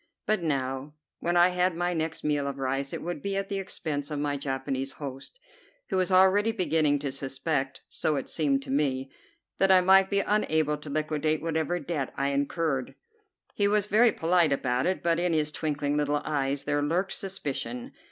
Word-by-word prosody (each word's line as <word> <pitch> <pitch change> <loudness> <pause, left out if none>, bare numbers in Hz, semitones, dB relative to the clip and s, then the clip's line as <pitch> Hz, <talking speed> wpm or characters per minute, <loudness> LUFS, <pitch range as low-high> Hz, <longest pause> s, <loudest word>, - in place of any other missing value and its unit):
But 215 -3 +1
now, 135 -2 -2 0.2
when 175 +1 0
I 175 +1 +6
had 180 -1 +1
my 175 +1 0
next 160 -1 -2
meal 145 -2 0
of 140 -1 -4
rice, 135 +1 -2
it - - -5
would 175 +1 -4
be 200 0 -2
at 195 0 -3
the 200 -1 -2
expense 155 -6 -4
of 150 - -3
my 145 0 -1
Japanese 135 -1 -3
host, 140 - -8 0.5
who - - 0
was 185 +1 +1
already 190 +4 +5
beginning 160 -8 +2
to 140 -1 -3
suspect, 135 +1 -2
so 155 - -1
it 135 - -3
seemed 140 -4 0
to 135 - -7
me, 135 -2 0 0.5
that 195 0 +4
I 185 -1 +7
might 190 +1 +5
be 200 -1 +2
unable 160 -8 +1
to 150 - -8
liquidate 155 +1 -1
whatever 165 +1 -1
debt 150 -3 -3
I 140 0 +1
incurred. 140 -1 -1 0.6
He 205 - +2
was 205 -1 +2
very 220 +3 +5
polite 170 -2 +2
about 125 -1 0
it, 185 - -1
but 170 0 +2
in 175 -1 +1
his 155 -1 +1
twinkling 145 -2 -1
little 145 0 0
eyes 140 -1 -1
there 145 0 0
lurked 170 +6 0
suspicion. 140 -10 -4
155 Hz, 190 wpm, -28 LUFS, 140-180 Hz, 0.6 s, I